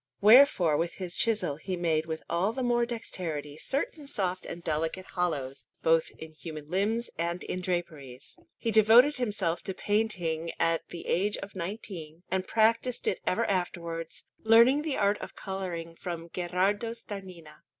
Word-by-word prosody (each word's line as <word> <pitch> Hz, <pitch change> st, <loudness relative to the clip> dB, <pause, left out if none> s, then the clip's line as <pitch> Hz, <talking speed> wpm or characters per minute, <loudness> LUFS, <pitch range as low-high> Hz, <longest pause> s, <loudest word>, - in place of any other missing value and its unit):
Wherefore 210 Hz, -, +6 dB
with 170 Hz, +2 st, -1 dB
his 180 Hz, -2 st, -6 dB
chisel 215 Hz, -11 st, +1 dB
he 185 Hz, +3 st, -4 dB
made 160 Hz, -2 st, +1 dB
with 160 Hz, -1 st, -4 dB
all 180 Hz, +6 st, +1 dB
the 260 Hz, -, -2 dB
more 240 Hz, -1 st, +2 dB
dexterity 165 Hz, -11 st, -5 dB
certain 280 Hz, -, -3 dB
soft 185 Hz, -9 st, -1 dB
and 170 Hz, -, -7 dB
delicate 165 Hz, +4 st, -2 dB
hollows, 150 Hz, -9 st, -3 dB, 0.2 s
both 160 Hz, 0 st, +3 dB
in 160 Hz, 0 st, -9 dB
human 155 Hz, -1 st, -9 dB
limbs 220 Hz, +5 st, 0 dB
and 170 Hz, +1 st, -1 dB
in 185 Hz, -, -4 dB
draperies. 155 Hz, -8 st, -4 dB, 0.2 s
He 230 Hz, -, -1 dB
devoted 225 Hz, +7 st, +6 dB
himself 205 Hz, -8 st, 0 dB
to 190 Hz, -, -3 dB
painting 175 Hz, -7 st, -1 dB
at 165 Hz, 0 st, +1 dB
the 170 Hz, -, -8 dB
age 205 Hz, +4 st, +1 dB
of 200 Hz, 0 st, -8 dB
nineteen, 175 Hz, -4 st, -6 dB
and 190 Hz, 0 st, 0 dB
practised 230 Hz, +2 st, +2 dB
it -, -, +1 dB
ever 230 Hz, +5 st, +2 dB
afterwards, 170 Hz, -3 st, -3 dB, 0.2 s
learning 235 Hz, +6 st, +6 dB
the 305 Hz, -3 st, -2 dB
art 205 Hz, 0 st, +2 dB
of -, -, -8 dB
colouring 180 Hz, -4 st, -5 dB
from 170 Hz, -1 st, -6 dB
Gherardo 190 Hz, +6 st, 0 dB
Starnina. 185 Hz, -8 st, -8 dB
185 Hz, 155 wpm, -29 LUFS, 165-220 Hz, 0.2 s, Wherefore